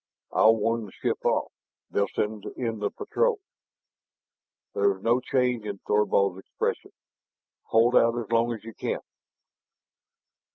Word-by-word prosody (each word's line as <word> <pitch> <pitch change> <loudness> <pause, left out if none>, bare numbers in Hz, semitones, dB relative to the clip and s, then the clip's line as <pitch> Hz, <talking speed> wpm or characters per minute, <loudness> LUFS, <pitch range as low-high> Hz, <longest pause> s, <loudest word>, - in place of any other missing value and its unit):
"I'll 110 +1 +5
warn 115 0 -1
the - - -13
ship - - -3
off; - - +1 0.4
they'll 100 0 +1
send 105 +1 -3
in 115 -3 -2
the 105 - 0
patrol." 475 -3 0 1.3
There 410 - +3
was 400 - -3
no 120 +2 +3
change 125 -2 0
in 100 -1 -4
Thorvald's 100 -2 +1
expression. - - -3 0.8
"Hold 115 +2 +3
out 115 +1 +4
as 115 -2 -5
long 115 +1 +3
as 110 -3 -6
you 115 0 -9
can!" - - -3
115 Hz, 135 wpm, -26 LUFS, 105-120 Hz, 1.3 s, I'll